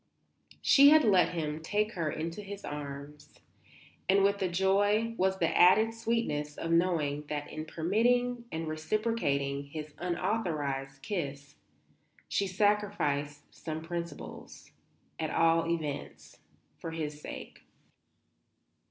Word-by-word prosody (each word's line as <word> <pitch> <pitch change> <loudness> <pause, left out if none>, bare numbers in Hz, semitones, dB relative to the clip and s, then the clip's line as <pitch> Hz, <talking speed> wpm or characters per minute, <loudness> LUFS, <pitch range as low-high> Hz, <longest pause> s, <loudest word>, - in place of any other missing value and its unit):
She 280 0 +8
had 310 +1 +7
let 195 -6 +5
him 155 -1 -3
take 210 +6 0
her 165 -7 -2
into 165 +6 -4
his 200 0 -8
arms, 145 0 -7 0.7
and 195 +1 +5
with 200 0 +2
the 190 - +1
joy 205 +5 +2
was 190 -2 +1
the 165 -3 0
added 215 +5 +6
sweetness 225 -11 -2
of 165 - -3
knowing 160 -4 +1
that 145 -1 -4
in 155 0 -5
permitting 235 +9 +1
and 160 0 -3
reciprocating 155 -5 -1
his 150 +1 -7
unauthorized 155 -8 -2
kiss 140 -6 -4 0.7
she 200 - 0
sacrificed 185 -8 0
some 160 -1 -6
principles, 170 0 -7 0.5
at 160 -1 -1
all 165 +1 +3
events, 155 -4 -4 0.4
for 165 - -5
his 150 -2 -5
sake. - - -8
165 Hz, 115 wpm, -30 LUFS, 150-205 Hz, 0.7 s, She